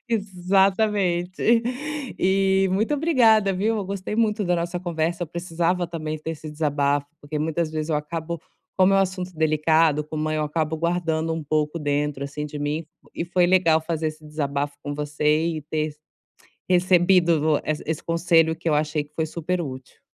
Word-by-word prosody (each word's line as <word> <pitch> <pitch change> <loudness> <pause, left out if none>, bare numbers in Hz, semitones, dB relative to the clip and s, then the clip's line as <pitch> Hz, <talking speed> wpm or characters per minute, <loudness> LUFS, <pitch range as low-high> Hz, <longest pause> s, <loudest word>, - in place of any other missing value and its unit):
Exatamente. 195 0 +1 0.6
E, 190 0 +3
muito 215 +9 +1
obrigada, 230 -10 +4
viu, 215 +5 0
eu 200 - -3
gostei 200 +1 -4
muito 215 -2 +1
da 180 -1 +2
nossa 170 +1 -2
conversa, 170 -1 -2
eu - - -2
precisava, 170 +1 -1
também, 155 -2 -4
ter 160 +2 -5
esse 155 -1 -8
desabafo, 145 -2 0
porque 150 +1 -5
muitas 160 +1 -1
vezes 155 0 -3
eu 155 - +1
acabo, 165 +2 -4 0.4
como 190 +1 +5
é - - +5
um - - +5
assunto 185 -1 -2
delicado, 155 0 +2
como 155 0 -3
eu 155 0 0
acabo 155 +1 -1
guardando 165 -1 0
um 160 -1 -3
pouco 150 +2 -1
dentro, 145 -1 -1
assim, 145 +1 -5
de 150 0 -6
mim, 150 +3 -2 0.3
e 170 - -2
foi 175 0 +2
legal 170 -3 +4
fazer 160 -1 -2
esse 155 0 -10
desabafo 145 -1 -2
com 145 - -4
você, 150 +2 +1
e 155 -3 -3
ter 155 0 -3 0.7
recebido 175 -4 +4
essa 155 0 -2
esse 160 -1 -2
conselho, 165 -1 +2
que 165 0 -3
eu 150 - +3
achei 150 0 0
que 145 - -26
foi 160 - -1
super 170 +3 -2
útil. 130 -5 -8
165 Hz, 175 wpm, -24 LUFS, 150-180 Hz, 0.7 s, como